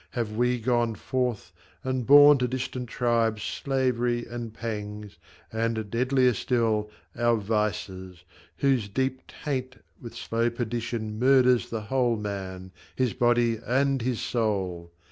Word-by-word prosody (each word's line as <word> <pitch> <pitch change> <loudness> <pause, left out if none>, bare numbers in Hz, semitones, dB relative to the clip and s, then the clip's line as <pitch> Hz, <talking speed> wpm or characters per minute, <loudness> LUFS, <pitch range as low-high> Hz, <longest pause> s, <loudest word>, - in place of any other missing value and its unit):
have 115 -3 -2
we 125 +2 +1
gone 120 -1 +1
forth 120 -7 -2 0.3
And 130 -2 -2
borne 145 0 +8
to 125 - +1
distant 130 -1 -4
tribes 115 -3 +1
slavery 125 -3 -1
and 120 -1 -6
pangs, 105 -4 -6 0.3
And, 110 -2 -2
deadlier 125 +1 +3
far, 110 -2 0 0.3
our 120 0 +2
vices, 100 -4 -3 0.3
whose 130 -5 +1
deep 130 +4 -1
taint 130 -3 -4 0.3
With 115 - -9
slow 115 +1 0
perdition 115 -2 -4
murders 125 -1 +4
the 115 -1 -3
whole 120 +1 +1
man, 95 -3 -6 0.2
His 130 -3 0
body 120 -2 +2
and 135 +2 +1
his 120 -1 -1
soul 95 -7 -2
120 Hz, 125 wpm, -26 LUFS, 105-125 Hz, 0.3 s, borne